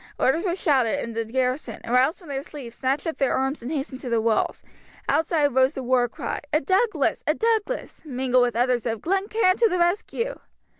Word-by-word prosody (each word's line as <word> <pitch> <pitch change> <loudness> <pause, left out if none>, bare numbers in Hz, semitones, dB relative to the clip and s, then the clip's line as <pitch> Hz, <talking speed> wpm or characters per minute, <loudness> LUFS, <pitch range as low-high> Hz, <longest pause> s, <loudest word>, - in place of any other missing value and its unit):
Orders 320 +8 +2
were 345 - 0
shouted, 275 - +2
and 235 -5 -4
the 230 0 -1
garrison, 255 0 -2
aroused 255 +6 +3
from 345 -5 -15
their 270 -1 -2
sleep, 275 -5 -9
snatched 265 +3 -1
up 325 - -3
their 270 - +2
arms 270 +3 -1
and 245 +5 -5
hastened 275 -3 -3
to 255 - -6
the 230 -1 +2
walls. 220 -1 0 0.4
Outside 295 -1 +2
rose 260 +3 +3
the 265 - -4
war 245 -1 +2
cry, - - -4
"A 305 - +3
Douglas! 380 - +1
A - - +3
Douglas!" 455 +1 -1
mingled 255 -3 +1
with 245 -1 +1
others 245 0 +1
of, 225 -1 -2
"Glen 390 +3 0
Cairn 420 -4 +2
to 460 -1 +4
the 365 - 0
rescue!" 410 +7 0
270 Hz, 205 wpm, -24 LUFS, 250-345 Hz, 0.4 s, to